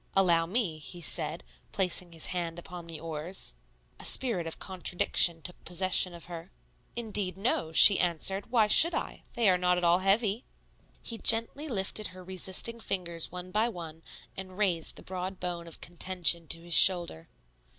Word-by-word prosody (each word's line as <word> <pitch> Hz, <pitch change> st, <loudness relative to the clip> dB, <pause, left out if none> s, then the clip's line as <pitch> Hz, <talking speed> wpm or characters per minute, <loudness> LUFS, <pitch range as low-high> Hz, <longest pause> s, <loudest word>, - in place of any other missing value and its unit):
"Allow 170 Hz, -4 st, +3 dB
me," 185 Hz, -6 st, -2 dB
he 175 Hz, +4 st, -9 dB
said, 170 Hz, -, -2 dB, 0.3 s
placing 180 Hz, -2 st, 0 dB
his 165 Hz, -1 st, -5 dB
hand 170 Hz, -2 st, -4 dB
upon 175 Hz, 0 st, -10 dB
the 165 Hz, -2 st, -8 dB
oars. 160 Hz, -, -5 dB, 0.5 s
A -, -, -11 dB
spirit 215 Hz, -11 st, +1 dB
of 165 Hz, -, -5 dB
contradiction 175 Hz, -3 st, 0 dB
took 180 Hz, -, -9 dB
possession 180 Hz, 0 st, +1 dB
of 170 Hz, -, -12 dB
her. 170 Hz, 0 st, -10 dB, 0.4 s
"Indeed, 210 Hz, -5 st, -3 dB
no," 195 Hz, -6 st, -1 dB
she 195 Hz, +5 st, +8 dB
answered; 180 Hz, +4 st, -1 dB
"why 230 Hz, -3 st, +3 dB
should 330 Hz, +11 st, +6 dB
I? -, -, -5 dB
They 235 Hz, -2 st, 0 dB
are 180 Hz, -1 st, +3 dB
not 180 Hz, 0 st, +1 dB
at 180 Hz, -, -3 dB
all 170 Hz, +1 st, +4 dB
heavy." 200 Hz, +3 st, 0 dB, 0.6 s
He 230 Hz, -2 st, -5 dB
gently 230 Hz, +7 st, +3 dB
lifted 210 Hz, -3 st, -2 dB
her 185 Hz, 0 st, -12 dB
resisting 190 Hz, +5 st, -2 dB
fingers 170 Hz, -6 st, -1 dB
one 180 Hz, +1 st, -8 dB
by 220 Hz, +4 st, 0 dB
one 165 Hz, -6 st, -9 dB, 0.3 s
and 185 Hz, -1 st, -9 dB
raised 180 Hz, -6 st, -1 dB
the -, -, -14 dB
broad 185 Hz, 0 st, -6 dB
bone 175 Hz, -1 st, -5 dB
of 165 Hz, -, -11 dB
contention 175 Hz, -1 st, 0 dB
to 165 Hz, +2 st, -4 dB
his 170 Hz, 0 st, -5 dB
shoulder. 175 Hz, -, +5 dB
180 Hz, 170 wpm, -28 LUFS, 170-195 Hz, 0.6 s, she